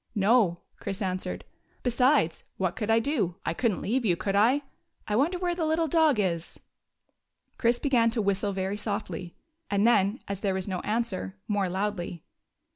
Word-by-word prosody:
" - - -44
No," 205 -8 +4 0.2
Chris 195 0 -4
answered. 185 -3 -3 0.2
" - - -37
Besides, 250 - +2
what 185 -2 -1
could 210 - -3
I 225 - +5
do? 230 - 0
I 165 - 0
could 235 +6 +1
n't - - -6
leave 245 +5 0
you, 180 -6 +2
could 195 +2 -1
I? 245 +8 +4 0.4
I 210 - 0
wonder 310 - +2
where 355 -1 0
the 345 -1 -2
little 320 +1 +1
dog 315 -4 +4
is? 170 -4 -2 0.5
" - - -48
Chris 235 0 +3
began 245 -4 +3
to 230 0 -2
whistle 200 +1 0
very 190 +1 -2
softly, 205 -4 -4 0.3
and 200 +1 +2
then, 215 0 +3
as 200 -1 -3
there 195 -2 0
was 190 0 -3
no 185 -2 -2
answer, 210 - -2
more 200 -3 0
loudly. 185 -3 -3
210 Hz, 190 wpm, -28 LUFS, 190-245 Hz, 0.5 s, I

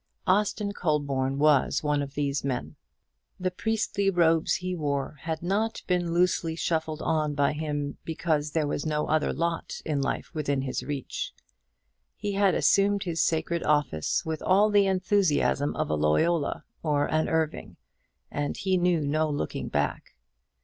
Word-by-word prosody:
Austin 205 +1 +1
Colborne 140 -7 0
was 150 -1 +3
one 150 -1 +1
of 140 0 -6
these 140 -1 -1
men. 130 -2 -3 0.6
The 185 0 -1
priestly 200 0 0
robes 165 -3 +3
he 185 0 -3
wore 145 -3 -2
had 160 0 -4
not 210 +5 -1
been 175 -2 0
loosely 170 -1 +1
shuffled 160 -1 -2
on 155 -2 0
by 140 0 +2
him 150 -2 -3
because 160 -2 -1
there 155 0 0
was 145 0 -2
no 150 -1 0
other 155 -1 +1
lot 170 0 -2
in 150 -3 0
life 135 - -3
within 145 -4 -1
his 130 -2 -2
reach. 135 0 -4 0.8
He 205 - -3
had 200 -1 +3
assumed 200 0 +3
his 170 -3 -1
sacred 165 +1 0
office 145 - +1
with 160 -1 -3
all 205 +3 +4
the 200 -1 +4
enthusiasm 185 -6 +1
of - - -1
a - - +2
Loyola 140 - +1 0.2
or 145 -2 +1
an 155 +1 0
Irving, 155 - -2 0.5
and 145 0 -2
he 190 -1 +1
knew 175 -2 +2
no 155 +2 +1
looking 145 -1 -3
back. - - -2
155 Hz, 155 wpm, -27 LUFS, 145-180 Hz, 0.8 s, all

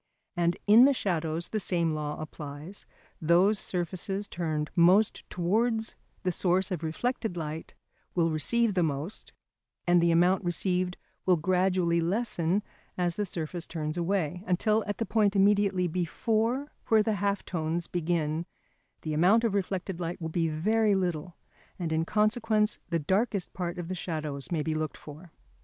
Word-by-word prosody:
And 175 0 +1
in 220 +5 +8
the 280 - +5
shadows 165 -5 -1
the 215 - -1
same 170 -4 0
law 150 -1 -3
applies: 150 +4 -8 0.3
those 180 +6 +4
surfaces 190 +3 -3
turned 155 -3 -2
most 185 +5 +4
towards 220 +5 0 0.3
the 185 - +1
source 185 +2 +1
of 180 - -2
reflected 200 +4 -2
light 160 0 -5 0.4
will 165 -2 +2
receive 220 +9 +1
the 185 - +2
most, 155 +4 -3 0.5
and 175 0 +4
the 170 - +3
amount 180 +4 +3
received 180 +1 0 0.3
will 180 -2 +5
gradually 180 0 +2
lessen 195 0 0 0.3
as 175 -2 0
the 205 -1 -1
surface 170 0 -4
turns 155 -2 -3
away, 175 -1 -1
until 210 +4 +2
at 205 - -2
the 225 - -1
point 210 -1 +2
immediately 195 -2 +3
before 225 - -1 0.2
where 220 -1 +5
the 215 -1 0
half 200 -1 0
tones 165 0 -2
begin 165 -1 -1 0.6
the 155 - -2
amount 185 +9 +4
of 225 -4 +1
reflected 190 -2 -2
light 170 0 -3
will 160 -2 -4
be 165 0 0
very 210 +7 +2
little, 175 -2 -2 0.4
and 165 -3 -2
in 160 +1 +1
consequence 215 +1 +1
the 170 - +1
darkest 190 +5 0
part 175 -1 -3
of 175 -2 -5
the 185 - -3
shadows 155 -5 -4
may 160 -3 0
be 160 - -1
looked 155 -1 -3
for. 155 +3 -12
180 Hz, 155 wpm, -28 LUFS, 165-205 Hz, 0.6 s, in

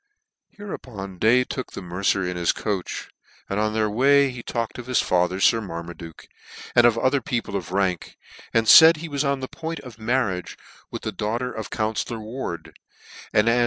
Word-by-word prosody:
Hereupon 105 - -8
Day 120 +5 +4
took 130 0 -6
the - - -6
mercer 90 +1 0
in 90 - -3
his 85 -1 +2
coach, 100 -4 -4 0.4
and 100 - -2
on 110 0 0
their 110 -1 +2
way 135 +5 +4
he 125 -1 -8
talked 115 0 -4
of 120 - -8
his 125 -2 +2
father 90 +1 +1
Sir 115 +3 +4
ivlar 85 -5 -6
maduke, 85 -2 -11 0.5
and 120 0 +7
of 115 -1 +2
other 130 +3 +2
people 120 -9 -3
of 90 -3 -4
rank; 95 -2 -1 0.3
and 115 -1 +2
laid 160 0 +7
he 165 +2 -6
was 145 -2 -1
on 140 -1 0
the 130 - -4
point 165 +3 -6
of 120 -4 -12
marriage 110 -6 -1 0.3
with - - -7
the - - -2
daugh 105 +2 -2
ter 125 +1 -3
of 110 - -6
counfcllor 110 +1 -2
Ward, 110 -7 -6 0.6
and 105 +2 +3
as 115 +1 +4
h? - - +3
110 Hz, 200 wpm, -23 LUFS, 95-130 Hz, 0.6 s, and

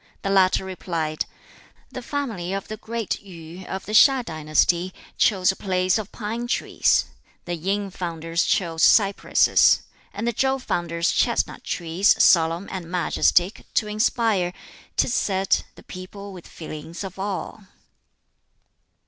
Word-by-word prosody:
The 195 - -1
latter 190 -1 +3
replied, 165 -4 -3 0.7
"The 255 - -6
Family 230 -10 -4
of 195 - -4
the 215 - -5
Great 230 -1 -4
Yu, 175 -1 -11
of 190 0 -5
the - - -7
HiŠ 260 +3 +6
dynasty, 160 +3 0 0.2
chose 190 -3 +3
a - - -8
place 185 +1 0
of 210 - -7
pine 230 +2 -4
trees; - - +2 0.4
the 175 - -3
Yin 195 +4 -2
founders 165 -1 -2
chose 165 -3 0
cypresses; 200 -2 +4 0.3
and 230 - -4
the 235 - +1
Chow 265 +4 +1
founders 170 -8 -1
chestnut - - 0
trees, 175 +3 +2
solemn 165 +2 +4
and 180 -3 -6
majestic, 180 +1 +1
to - - +2
inspire, 210 -4 +1 0.4
'tis 240 - +2
said, 195 -4 +1
the - - -15
people 200 +2 -9
with 180 -2 -11
feelings 160 +2 -8
of 195 0 -8
awe." 195 +2 -4
190 Hz, 135 wpm, -23 LUFS, 170-210 Hz, 0.7 s, HiŠ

